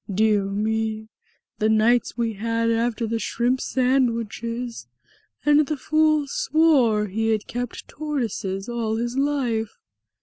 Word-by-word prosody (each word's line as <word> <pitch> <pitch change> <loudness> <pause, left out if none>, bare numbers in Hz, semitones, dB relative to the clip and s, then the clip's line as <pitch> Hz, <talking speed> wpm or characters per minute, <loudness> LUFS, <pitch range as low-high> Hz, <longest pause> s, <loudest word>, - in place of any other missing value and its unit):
Dear 210 0 +2
me! 220 +2 -2 0.5
The 215 - +2
nights 230 +3 +2
we 230 -1 0
had 230 +2 0
after 230 0 0
the 225 +1 -2
shrimp 245 +3 0
sandwiches! 235 - -1 0.6
And 295 0 +4
the 305 - -2
fool 310 +1 +2
swore 270 -8 +3
he 220 +3 -1
had 215 -2 0
kept 245 0 -5
tortoises 235 -10 -3
all 230 -2 -2
his 240 +2 -2
life!" 260 -6 -1
230 Hz, 125 wpm, -23 LUFS, 220-255 Hz, 0.6 s, And